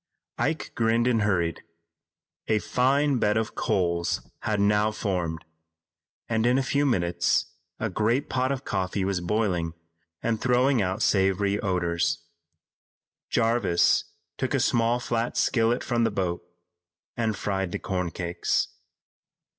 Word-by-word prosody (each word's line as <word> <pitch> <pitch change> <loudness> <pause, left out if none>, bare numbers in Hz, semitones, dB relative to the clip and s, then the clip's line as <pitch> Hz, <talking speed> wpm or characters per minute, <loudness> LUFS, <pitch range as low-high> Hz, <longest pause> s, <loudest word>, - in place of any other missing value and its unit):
Ike 150 +6 -1
grinned 115 +1 +2
and 120 -3 +2
hurried. 85 -6 0 0.9
A 110 - +3
fine 130 +6 +2
bed 105 0 +2
of 110 -1 -1
coals 85 -2 0
had 105 -2 -1
now 105 +1 +3
formed, 90 -7 -3 0.8
and 115 0 +1
in 125 +1 +4
a 135 - +1
few 140 +2 +1
minutes 90 -10 +1 0.3
a 110 - 0
great 115 +7 0
pot 130 +1 0
of 135 0 -3
coffee 95 0 -1
was 95 -2 -1
boiling 90 -4 0 0.5
and 115 -2 0
throwing 125 0 +3
out 95 +3 -1
savory 100 +1 +2
odors. 85 -3 0 1.1
Jarvis 115 -6 +2 0.3
took - - 0
a - - +2
small 120 +1 +2
flat 120 -1 -2
skillet 115 +1 +2
from 120 -2 0
the 115 - +3
boat 90 -4 -2 0.7
and 110 -3 -1
fried 95 -3 -2
the - - -2
corn 90 -2 -2
cakes. 85 +1 -1
105 Hz, 130 wpm, -26 LUFS, 90-120 Hz, 1.1 s, in